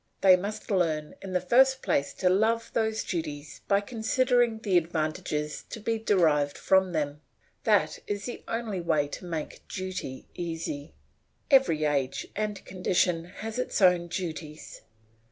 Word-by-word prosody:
They 190 -1 +8
must 200 +4 -5
learn 160 -5 0
in 190 -1 -6
the 180 - +3
first 260 +8 +4
place 140 - +1
to 185 - 0
love 220 +5 +2
those 220 -1 0
duties 150 -4 -5
by 200 0 +3
considering 240 +2 +1
the 205 -4 -1
advantages 155 -2 -1
to - - -6
be 225 +1 -1
derived 155 -9 +2
from 190 -1 +3
them 150 -2 -2 0.4
that - - +3
is 205 -1 -3
the 245 - -6
only 225 -5 -2
way 155 -4 +1
to 180 - -7
make 165 -3 -5
duty 185 -8 -5
easy. 165 -3 -5 0.6
Every 260 - +5
age 140 -3 0
and 210 -2 -3
condition 180 -2 +1
has 215 +6 -6
its 255 - -1
own 180 -3 +4
duties. 160 -3 -6
180 Hz, 145 wpm, -28 LUFS, 155-215 Hz, 0.6 s, They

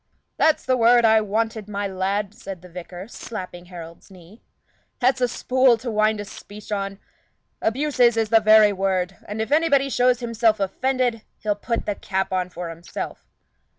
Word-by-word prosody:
"That's 315 -1 +2
the 255 0 +2
word 235 0 +5
I 220 0 +5
wanted, 215 0 -2
my 205 0 -3
lad!" 195 +2 -2
said 190 -4 -9
the 180 - -12
vicar, 180 +2 -9
slapping 185 -7 -8
Harold's 170 -1 -11
knee. 185 +3 -16 0.6
"That's 255 0 +2
a 250 - +4
spool 255 0 +3
to 235 +1 -5
wind 215 0 +2
a 205 - -5
speech 205 +2 -12
on. 195 -1 -2 0.6
Abuses 245 -1 +2
is 220 -1 +1
the 225 0 +6
very 215 -1 +6
word; 190 -1 -1
and 210 +2 -5
if 220 - -9
anybody 285 -3 +3
shows 250 -1 +3
himself 230 -2 +1
offended, 245 +4 0 0.2
he'll 210 -1 -1
put 230 +3 -3
the 205 - -1
cap 190 -1 -3
on 180 -1 -1
for 175 -1 -6
himself." 165 +1 -7
215 Hz, 170 wpm, -23 LUFS, 190-240 Hz, 0.6 s, the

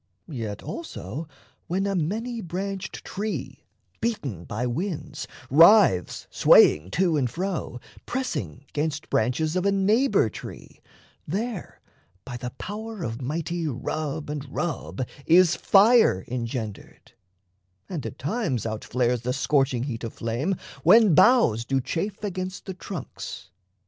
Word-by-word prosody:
Yet 110 -6 -5
also 155 - -6 0.4
when 190 +3 0
a 200 - 0
many 220 +8 -2
branched 190 +2 -5
tree, 210 +2 -5 0.3
Beaten 135 - -3
by 110 +4 -3
winds, 150 +2 -3 0.2
writhes 165 - +6
swaying 75 +4 +6
to 175 -4 +3
and 130 -4 +1
fro, 175 -4 -3 0.3
Pressing 140 - -3
'gainst 150 0 -2
branches 140 +9 +1
of 185 - +1
a 200 - +3
neighbour 205 - +3
tree, - - -10 0.5
There 210 +3 -4 0.4
by 125 - -6
the 125 0 -4
power 215 -1 -6
of 115 +2 -4
mighty 165 +5 -2
rub 150 +3 -3
and 150 -1 -4
rub 150 -5 -3 0.2
Is 175 0 +6
fire 205 - +5
engendered; 120 +4 -5 0.8
and 170 -7 -4
at - - -6
times 150 - -2
out 110 -1 -3
flares 125 -1 0
The 125 +1 -1
scorching 135 -3 +1
heat 125 -4 -4
of 115 - -5
flame, 120 +12 -1 0.3
when 205 - +6
boughs 155 - +5
do 135 +3 0
chafe 180 +11 -3
Against 185 -2 -4
the 190 - -5
trunks. 175 - -7
155 Hz, 130 wpm, -25 LUFS, 125-195 Hz, 0.8 s, writhes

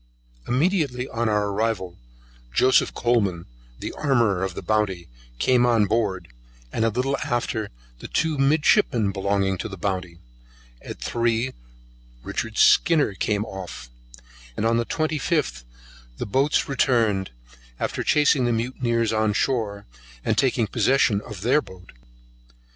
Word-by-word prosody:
Immediately 135 -3 0
on 115 0 -1
our 105 -1 +1
arrival, 100 -4 -2 0.6
Joseph 130 - +3
Coleman, 100 -8 0 0.3
the - - -6
armourer 115 -10 +1
of 95 -2 -3
the - - -6
Bounty, 105 -5 0 0.3
came 125 - +3
on 115 -3 +3
board, 100 -4 -1 0.5
and 110 - 0
a 115 - +3
little 130 +5 -1
after 120 -4 -2 0.3
the - - -8
two 160 -3 -1
midshipmen 135 - +3
belonging 95 -1 0
to 110 - -4
the 95 - -8
Bounty; 90 -2 -3 0.6
at - - -9
three 120 +2 -1 0.7
Richard 115 -1 -4
Skinner 150 -9 +4
came 105 +2 -1
off, 90 - -8 0.7
and 110 - -1
on 115 +1 +3
the 115 - -1
25th 150 - -1 0.5
the - - -3
boats 135 +7 +1
returned, 115 -8 +1 0.5
after - - -2
chasing 145 -3 +3
the 120 - +1
mutineers 115 -1 0
on 110 -1 +1
shore, 105 -4 -1 0.4
and - - +1
taking 130 -4 +2
possession 115 -1 +2
of 105 -3 -9
their 130 +8 +3
boat. 95 -6 -14
115 Hz, 130 wpm, -24 LUFS, 100-130 Hz, 0.7 s, Skinner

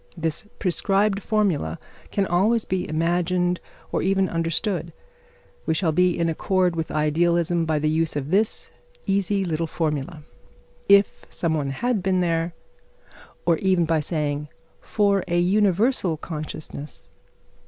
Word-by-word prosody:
This 165 +4 -2
prescribed 195 +2 +1
formula 190 - 0 0.3
can 200 - 0
always 210 +6 +2
be 180 -3 -2
imagined 175 +2 +1 0.3
or - - 0
even 195 0 +2
understood. 165 +1 -2 0.7
We 160 - +2
shall 165 -1 +1
be 180 +2 +2
in 170 - +1
accord 180 +2 +1
with 160 -1 -3
idealism 170 +2 +1
by 155 -1 +1
the 150 +1 0
use 160 0 0
of 145 +1 -3
this 210 +3 0 0.3
easy 195 0 +1
little 165 -1 -1
formula, 155 0 -3 0.7
"If 200 0 +4
some 165 -2 -1
one 145 -3 -1
had 220 - -1
been 185 0 +1
there," 165 -1 0 0.9
or 170 -2 +3
even 185 -3 +2
by 160 0 +1
saying, 150 -1 -2 0.3
"For 200 -2 +1
a 175 - 0
universal 195 0 +2
consciousness...." 155 -2 -7
175 Hz, 130 wpm, -24 LUFS, 160-195 Hz, 0.9 s, If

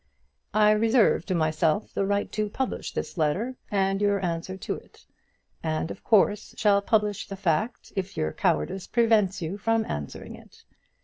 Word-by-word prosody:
I 210 0 +6
reserve 225 +2 +3
to 185 - 0
myself 155 +3 +1
the 195 - 0
right 200 0 0
to 215 -1 -1
publish 265 +4 -3
this - - -5
letter 195 +12 0
and 195 0 +1
your 205 -1 +2
answer 170 +2 -3
to - - -3
it; - - -13 0.6
and 160 0 -2
of - - -10
course 210 -1 +2
shall 205 -2 +4
publish 210 -1 0
the 195 - -6
fact 195 +6 -1
if 195 0 -4
your 80 -1 -1
cowardice 75 - 0
prevents 215 -6 +2
you 180 +6 -4
from 225 +1 +1
answering 75 -1 -6
it. - - -18
200 Hz, 165 wpm, -26 LUFS, 170-215 Hz, 0.6 s, I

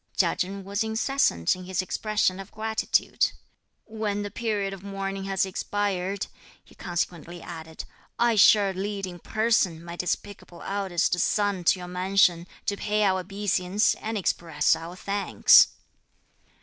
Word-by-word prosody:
Chia - - +3
Chen 195 0 -3
was 200 +3 -1
incessant 220 - +1
in 185 0 -10
his 185 0 -3
expression 195 0 0
of 195 - -9
gratitude. 220 0 0 0.5
"When 215 -2 -3
the 205 - -5
period 205 -3 -2
of 195 - -9
mourning 195 0 -4
has 195 -1 +1
expired," 195 0 -2 0.4
he - - -20
consequently 175 -1 -4
added, 160 -2 -8 0.3
"I 235 -1 +3
shall 205 -1 +6
lead 195 +1 -3
in 175 -1 -9
person, 215 -6 +1
my 170 0 -7
despicable 180 0 -5
eldest 190 -3 0
son 205 -3 +1
to 185 - +4
your 180 -1 -8
mansion, 180 -1 +2 0.2
to 200 - -1
pay 210 +1 0
our 190 -2 +2
obeisance, 195 +1 0
and 220 0 -4
express 165 -5 +1
our 165 +2 -8
thanks." 200 +2 +5
195 Hz, 140 wpm, -26 LUFS, 180-205 Hz, 0.5 s, shall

